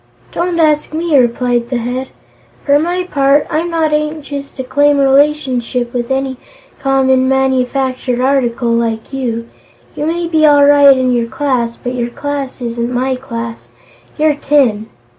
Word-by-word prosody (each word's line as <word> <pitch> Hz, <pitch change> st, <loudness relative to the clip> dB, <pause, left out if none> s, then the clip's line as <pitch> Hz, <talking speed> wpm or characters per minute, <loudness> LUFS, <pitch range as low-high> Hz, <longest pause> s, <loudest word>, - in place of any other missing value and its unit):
"Don't 345 Hz, -1 st, -2 dB
ask 305 Hz, -1 st, +1 dB
me," 330 Hz, -1 st, 0 dB
replied 240 Hz, -1 st, +1 dB
the 255 Hz, -, -1 dB
Head. 250 Hz, +3 st, -3 dB, 0.6 s
"For 285 Hz, 0 st, +4 dB
my 350 Hz, +3 st, -1 dB
part, 285 Hz, -4 st, +2 dB
I'm 325 Hz, +3 st, -1 dB
not 320 Hz, -2 st, 0 dB
anxious 300 Hz, -2 st, -3 dB
to 260 Hz, -, -5 dB
claim 285 Hz, +3 st, +2 dB
relationship 270 Hz, -3 st, +1 dB
with 240 Hz, -1 st, -3 dB
any 265 Hz, -1 st, -2 dB, 0.4 s
common, 265 Hz, -1 st, +2 dB
manufactured 260 Hz, -1 st, 0 dB
article, 250 Hz, -2 st, 0 dB
like 230 Hz, +1 st, -2 dB
you. 230 Hz, -3 st, -3 dB, 0.5 s
You 300 Hz, -, -3 dB
may 340 Hz, +1 st, -1 dB
be 320 Hz, -2 st, +1 dB
all 290 Hz, -2 st, +6 dB
right 285 Hz, -1 st, +6 dB
in 255 Hz, -1 st, +1 dB
your 235 Hz, -1 st, 0 dB
class, 240 Hz, -3 st, -2 dB
but 245 Hz, -, -5 dB
your 240 Hz, -1 st, -2 dB
class 280 Hz, 0 st, -5 dB
isn't 235 Hz, 0 st, -3 dB
my 255 Hz, +2 st, 0 dB
class. 230 Hz, -3 st, -7 dB, 0.5 s
You're 310 Hz, 0 st, +3 dB
tin." 270 Hz, -7 st, +1 dB
265 Hz, 150 wpm, -14 LUFS, 245-290 Hz, 0.6 s, all